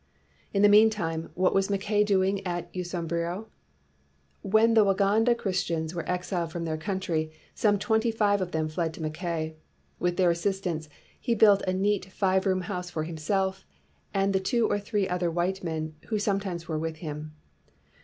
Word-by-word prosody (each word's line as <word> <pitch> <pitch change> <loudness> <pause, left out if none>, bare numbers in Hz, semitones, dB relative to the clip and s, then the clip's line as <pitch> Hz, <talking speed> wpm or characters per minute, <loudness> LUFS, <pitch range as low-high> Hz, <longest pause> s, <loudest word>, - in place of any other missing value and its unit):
In 200 0 +2
the - - +9
meantime, 205 -6 +3
what 185 +1 +2
was 195 0 +2
Mackay 205 +1 +1
doing 195 -1 +1
at 175 -2 -4
Usambiro? 175 +2 -3 1.0
When 220 +3 +4
the 220 -1 +6
Waganda 205 +4 +3
Chris 190 -5 0
tians 160 -1 -2
were 170 -2 -5
exiled 180 -2 -2
from 170 0 -4
their 160 -1 -1
country, 160 -2 -2 0.2
some 205 -2 +2
twenty 220 +3 +1
five 205 -3 +2
of 180 -1 -3
them 160 -1 0
fled 160 +1 -2
to - - -9
Mackay. 160 0 -3 0.4
With 175 0 0
their 180 -2 +4
assistance, 170 -3 -2 0.3
he 235 -2 0
built 205 -2 +6
a 185 - +1
neat 195 +1 +1
five 190 0 +1
room 185 -1 +2
house 180 -2 -4
for 155 -3 -3
himself 190 +4 -1 0.5
and 195 0 +1
the 190 - +3
two 230 +4 +1
or 205 - 0
three 205 -1 -1
other 180 -1 0
white 175 +3 -1
men 160 -2 -3
who 220 - 0
sometimes 195 -5 -2
were 160 -2 -2
with 160 0 -3
him. 155 -1 -7
185 Hz, 175 wpm, -27 LUFS, 165-200 Hz, 1.0 s, the